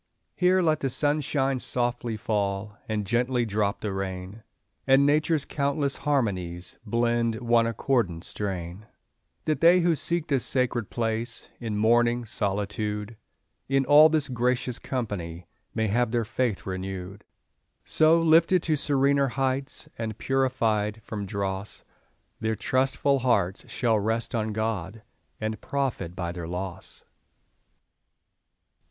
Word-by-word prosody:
Here 185 Hz, 0 st, +3 dB
let 155 Hz, -2 st, +2 dB
the 135 Hz, -, -1 dB
sunshine 140 Hz, -1 st, +1 dB
softly 120 Hz, -2 st, -1 dB
fall, 105 Hz, -2 st, -2 dB
And 105 Hz, -1 st, -1 dB
gently 120 Hz, +3 st, +1 dB
drop 105 Hz, -1 st, -1 dB
the 105 Hz, -2 st, -2 dB
rain, 95 Hz, +2 st, -5 dB, 0.5 s
And 135 Hz, +1 st, +6 dB
Nature's 150 Hz, +1 st, +2 dB
countless 140 Hz, 0 st, -1 dB
harmonies 95 Hz, -11 st, -1 dB
Blend 115 Hz, 0 st, +1 dB
one 115 Hz, 0 st, +2 dB
accordant 115 Hz, -7 st, 0 dB
strain; 95 Hz, 0 st, -4 dB, 0.6 s
That 155 Hz, -, 0 dB
they 175 Hz, +2 st, +6 dB
who 170 Hz, 0 st, +3 dB
seek 170 Hz, +1 st, -1 dB
this 140 Hz, -5 st, 0 dB
sacred 120 Hz, -4 st, 0 dB
place, 115 Hz, 0 st, -2 dB
In 110 Hz, -3 st, -3 dB
mourning 120 Hz, +2 st, +3 dB
solitude, 105 Hz, +1 st, -2 dB, 0.5 s
In 135 Hz, 0 st, +2 dB
all 150 Hz, +3 st, +8 dB
this 155 Hz, -3 st, +1 dB
gracious 125 Hz, -1 st, -1 dB
company 90 Hz, -9 st, -4 dB, 0.3 s
May 110 Hz, -1 st, +1 dB
have 120 Hz, +3 st, +2 dB
their 120 Hz, -1 st, 0 dB
faith 115 Hz, -2 st, -1 dB
renewed. 95 Hz, +1 st, -5 dB, 0.6 s
So, 160 Hz, +1 st, +4 dB
lifted 165 Hz, +2 st, +5 dB
to 155 Hz, -, +1 dB
serener 140 Hz, -1 st, +2 dB
heights, 135 Hz, +1 st, -2 dB
And 110 Hz, -2 st, -4 dB
purified 115 Hz, -5 st, 0 dB
from 105 Hz, -2 st, -5 dB
dross, 100 Hz, 0 st, -4 dB, 0.6 s
Their 110 Hz, 0 st, -1 dB
trustful 135 Hz, +3 st, +1 dB
hearts 100 Hz, -7 st, 0 dB
shall 115 Hz, -3 st, +1 dB
rest 110 Hz, +2 st, -1 dB
on 110 Hz, -2 st, -1 dB
God, 110 Hz, -1 st, -3 dB, 0.4 s
And 110 Hz, 0 st, -3 dB
profit 125 Hz, -11 st, -2 dB
by 85 Hz, -2 st, -3 dB
their 85 Hz, -1 st, -6 dB
loss. 90 Hz, +1 st, -6 dB
115 Hz, 125 wpm, -26 LUFS, 105-135 Hz, 0.6 s, all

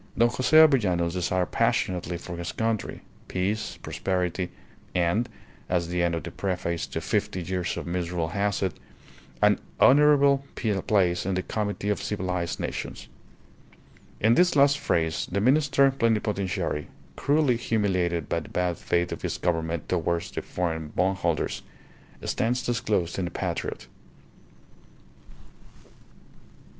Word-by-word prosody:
Don 120 Hz, +1 st, +5 dB
Jose 130 Hz, +6 st, +3 dB
Avellanos 100 Hz, -, +5 dB
desired 90 Hz, 0 st, 0 dB
passionately 90 Hz, -1 st, 0 dB
for 85 Hz, +1 st, -7 dB
his 85 Hz, +1 st, -4 dB
country: 110 Hz, -2 st, -2 dB, 0.3 s
peace, 100 Hz, +4 st, -2 dB
prosperity, 90 Hz, -1 st, -1 dB, 0.5 s
and 90 Hz, +7 st, +1 dB, 0.4 s
(as 85 Hz, -2 st, 0 dB
the 90 Hz, 0 st, 0 dB
end 85 Hz, -1 st, +1 dB
of 80 Hz, -, -4 dB
the -, -, -6 dB
preface 90 Hz, -3 st, -2 dB
to -, -, -4 dB
"Fifty 90 Hz, -, -1 dB
Years 90 Hz, 0 st, -2 dB
of -, -, -4 dB
Misrule" 85 Hz, -1 st, -2 dB
has 100 Hz, +2 st, 0 dB
it) 95 Hz, -3 st, 0 dB, 0.7 s
"an -, -, +5 dB, 0.2 s
honourable 140 Hz, -1 st, +6 dB
place 95 Hz, -5 st, +1 dB
in 95 Hz, 0 st, -1 dB
the 95 Hz, -, -1 dB
comity 105 Hz, -1 st, -2 dB
of 105 Hz, -, 0 dB
civilized 90 Hz, -4 st, -2 dB
nations." -, -, -5 dB, 1.1 s
In 110 Hz, +2 st, +4 dB
this 175 Hz, +4 st, +4 dB
last 140 Hz, 0 st, +5 dB
phrase 80 Hz, -1 st, 0 dB
the 100 Hz, -, +1 dB
Minister 140 Hz, +3 st, +4 dB
Plenipotentiary, 105 Hz, -, -1 dB, 0.3 s
cruelly 145 Hz, -4 st, +2 dB
humiliated 95 Hz, -8 st, 0 dB
by 85 Hz, -, 0 dB
the 75 Hz, -, -11 dB
bad 90 Hz, -1 st, -1 dB
faith 85 Hz, 0 st, 0 dB
of -, -, -5 dB
his -, -, -2 dB
Government 80 Hz, -2 st, -1 dB
towards 85 Hz, -1 st, -1 dB
the -, -, -3 dB
foreign 80 Hz, -3 st, -3 dB
bondholders, 90 Hz, -2 st, 0 dB, 0.6 s
stands 120 Hz, +1 st, 0 dB
disclosed 110 Hz, -8 st, 0 dB
in 90 Hz, -, 0 dB
the -, -, -3 dB
patriot. -, -, -4 dB
95 Hz, 130 wpm, -26 LUFS, 85-115 Hz, 1.1 s, honourable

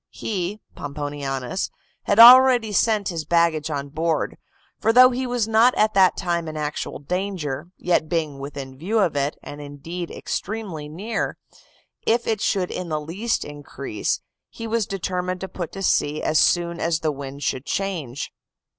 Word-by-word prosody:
He 200 Hz, 0 st, -3 dB, 0.2 s
(Pomponianus) 145 Hz, +1 st, -3 dB, 0.4 s
had 205 Hz, -, +2 dB
already 245 Hz, -1 st, +9 dB
sent 210 Hz, 0 st, +2 dB
his 165 Hz, -3 st, -3 dB
baggage 160 Hz, -1 st, +2 dB
on 140 Hz, -2 st, -3 dB
board; 160 Hz, +2 st, -1 dB, 0.4 s
for 225 Hz, -, +3 dB
though 255 Hz, +2 st, +8 dB
he 255 Hz, +1 st, -2 dB
was 245 Hz, -3 st, 0 dB
not 225 Hz, +3 st, +5 dB
at 215 Hz, 0 st, +3 dB
that 190 Hz, -1 st, +5 dB
time 170 Hz, -3 st, -1 dB
in 155 Hz, 0 st, -5 dB
actual 150 Hz, -1 st, -3 dB
danger, 170 Hz, -2 st, -3 dB
yet 170 Hz, -3 st, +1 dB
being 155 Hz, -4 st, -1 dB
within 135 Hz, -1 st, -7 dB
view 200 Hz, +8 st, -1 dB
of 185 Hz, -8 st, +2 dB
it, 140 Hz, +1 st, -1 dB
and 145 Hz, 0 st, -8 dB
indeed 155 Hz, +5 st, -6 dB
extremely 185 Hz, -8 st, -5 dB
near, 200 Hz, +9 st, -3 dB, 0.7 s
if 235 Hz, +1 st, +2 dB
it 220 Hz, -2 st, -1 dB
should 185 Hz, -3 st, 0 dB
in 180 Hz, -2 st, -4 dB
the 155 Hz, -1 st, -1 dB
least 190 Hz, +10 st, -2 dB
increase, 140 Hz, -6 st, -4 dB, 0.3 s
he 230 Hz, -, -8 dB
was 225 Hz, -2 st, 0 dB
determined 185 Hz, -1 st, -2 dB
to 190 Hz, -, -3 dB
put 175 Hz, -2 st, -6 dB
to 195 Hz, -, -5 dB
sea 150 Hz, -4 st, +1 dB
as 155 Hz, -, +3 dB
soon 170 Hz, -1 st, +2 dB
as 165 Hz, -1 st, 0 dB
the 155 Hz, -, +1 dB
wind 140 Hz, 0 st, -7 dB
should 130 Hz, +1 st, -2 dB
change. 165 Hz, -10 st, -3 dB
170 Hz, 165 wpm, -23 LUFS, 145-205 Hz, 0.7 s, already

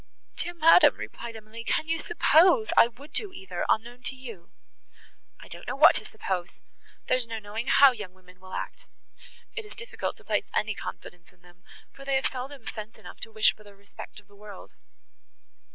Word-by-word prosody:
"Dear 350 Hz, -, -4 dB
madam," 330 Hz, +1 st, +7 dB
replied 235 Hz, -1 st, -7 dB
Emily, 220 Hz, +1 st, -9 dB
"can 310 Hz, -, 0 dB
you 330 Hz, 0 st, 0 dB
suppose 375 Hz, +7 st, +4 dB
I -, -, +8 dB
would 260 Hz, +6 st, -15 dB
do 415 Hz, -3 st, 0 dB
either, 190 Hz, -, -5 dB
unknown 240 Hz, +3 st, 0 dB
to 265 Hz, -, -3 dB
you!" 230 Hz, -10 st, -10 dB, 0.9 s
"I -, -, -12 dB
don't -, -, -11 dB
know -, -, -2 dB
what -, -, +8 dB
to -, -, -5 dB
suppose; 180 Hz, -2 st, -4 dB, 0.5 s
there 255 Hz, -, +3 dB
is 245 Hz, -2 st, -4 dB
no 225 Hz, -1 st, -4 dB
knowing 215 Hz, +3 st, -5 dB
how 280 Hz, -1 st, +7 dB
young 205 Hz, -7 st, -8 dB
women 185 Hz, -1 st, -19 dB
will 185 Hz, 0 st, -12 dB
act. -, -, -6 dB, 0.7 s
It 445 Hz, -, -4 dB
is 420 Hz, -, -11 dB
difficult 480 Hz, 0 st, -5 dB
to -, -, -18 dB
place -, -, -1 dB
any 220 Hz, 0 st, +1 dB
confidence 175 Hz, -3 st, -9 dB
in 175 Hz, -, -31 dB
them, 180 Hz, +1 st, -20 dB, 0.3 s
for 275 Hz, -, -13 dB
they 275 Hz, 0 st, 0 dB
have 265 Hz, -, +1 dB
seldom 260 Hz, -1 st, -4 dB
sense 215 Hz, 0 st, -7 dB
enough -, -, -12 dB
to 225 Hz, -, -5 dB
wish 215 Hz, 0 st, +4 dB
for 215 Hz, -, -18 dB
the 205 Hz, -1 st, -15 dB
respect 200 Hz, +1 st, -11 dB
of 205 Hz, -, -21 dB
the 205 Hz, -, -20 dB
world." 205 Hz, -1 st, -12 dB
225 Hz, 200 wpm, -27 LUFS, 200-275 Hz, 0.9 s, I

